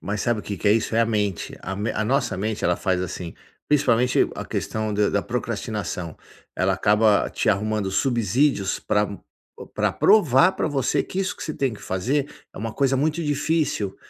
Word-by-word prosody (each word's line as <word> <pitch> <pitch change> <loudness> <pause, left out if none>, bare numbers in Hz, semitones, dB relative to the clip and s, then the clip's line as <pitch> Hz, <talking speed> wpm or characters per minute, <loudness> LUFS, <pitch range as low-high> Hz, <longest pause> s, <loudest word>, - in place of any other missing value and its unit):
Mas 100 +2 -3
sabe 120 -3 0
o - - -14
que 100 - -5
que 100 - +1
é - - +6
isso? 110 0 0
É 115 - +4
a 115 - +3
mente, 105 -4 -2
a 95 - -4
men 105 +3 -2
a 110 - 0
nossa 125 -3 0
mente 105 +2 -3
ela 90 0 +2
faz 95 -2 0
assim, 90 -2 -5 0.3
principalmente 125 -4 +3
a - - -5
questão 110 -1 -3
da 105 0 +2
da 100 - 0
procrastinação, 105 -8 -4 0.4
ela 95 +1 +2
acaba 105 0 +3
te - - -1
arrumando 105 -1 0
subsídios 120 -1 +1
pra 105 0 +1
o 100 - -8 0.5
pra - - 0
provar 180 - +5
para 190 - -2
você 135 -3 0
que 190 - -4
isso 185 -2 -2
que - - -8
você 155 - -4
tem 135 -4 0
que 105 - -10
fazer 135 +10 -1 0.2
é - - -11
uma 110 0 -4
coisa 135 -1 +2
muito 155 +4 0
difícil. 145 -8 -1
110 Hz, 200 wpm, -23 LUFS, 100-135 Hz, 0.5 s, é